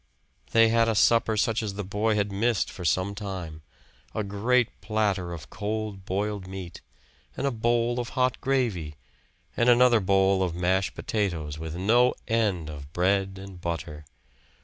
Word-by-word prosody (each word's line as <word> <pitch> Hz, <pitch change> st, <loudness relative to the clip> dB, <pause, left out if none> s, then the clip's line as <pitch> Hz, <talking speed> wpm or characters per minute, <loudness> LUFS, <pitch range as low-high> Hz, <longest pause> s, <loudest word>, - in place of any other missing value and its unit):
They 115 Hz, 0 st, +5 dB
had 115 Hz, 0 st, +3 dB
a 110 Hz, -, +1 dB
supper 115 Hz, 0 st, +3 dB
such 115 Hz, +2 st, +1 dB
as 105 Hz, -3 st, -4 dB
the 105 Hz, -, -3 dB
boy 105 Hz, +3 st, 0 dB
had 100 Hz, -1 st, 0 dB
missed 115 Hz, +3 st, 0 dB
for 90 Hz, -, -8 dB
some 95 Hz, +3 st, +1 dB
time; 95 Hz, -6 st, -6 dB, 0.5 s
a 110 Hz, -, 0 dB
great 110 Hz, +5 st, 0 dB
platter 100 Hz, -5 st, 0 dB
of 80 Hz, -6 st, -8 dB
cold 105 Hz, -2 st, -4 dB
boiled 100 Hz, 0 st, -2 dB
meat, 95 Hz, -2 st, -8 dB, 0.6 s
and -, -, -2 dB
a 140 Hz, -, +1 dB
bowl 120 Hz, +1 st, +1 dB
of 120 Hz, -, -3 dB
hot 130 Hz, 0 st, +1 dB
gravy, 110 Hz, -, -1 dB, 0.6 s
and 120 Hz, +1 st, +3 dB
another 120 Hz, -1 st, +6 dB
bowl 95 Hz, 0 st, +3 dB
of 90 Hz, -3 st, -1 dB
mashed 95 Hz, +3 st, 0 dB
potatoes, 80 Hz, -8 st, -2 dB
with 80 Hz, 0 st, -5 dB
no 120 Hz, +7 st, +3 dB
end 105 Hz, -8 st, 0 dB
of 70 Hz, -2 st, -9 dB
bread 95 Hz, +2 st, +1 dB
and 95 Hz, -2 st, -10 dB
butter. 80 Hz, -3 st, -4 dB
100 Hz, 160 wpm, -26 LUFS, 90-115 Hz, 0.6 s, another